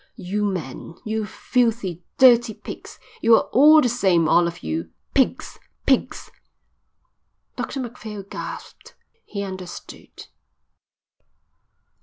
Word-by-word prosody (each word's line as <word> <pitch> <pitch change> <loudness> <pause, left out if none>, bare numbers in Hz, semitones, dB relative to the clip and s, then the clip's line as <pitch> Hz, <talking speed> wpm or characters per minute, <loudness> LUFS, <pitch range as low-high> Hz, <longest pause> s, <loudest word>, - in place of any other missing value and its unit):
"You 205 +1 -2
men! 170 -4 -5
You 220 -1 -2
filthy, 225 -10 -1
dirty 240 -3 +6
pigs! - - -10 0.2
You're 230 0 +6
all 305 +4 +7
the 250 - +2
same, 190 -9 +2
all 170 +2 +4
of 170 - -7
you. 80 +1 -3 0.2
Pigs! 265 - 0 0.3
Pigs!" - - 0 1.2
Dr 270 - -4
Macphail 220 -4 -7
gasped. - - -9 0.3
He 200 -1 -4
understood. 185 -2 -9
210 Hz, 100 wpm, -22 LUFS, 180-240 Hz, 1.2 s, all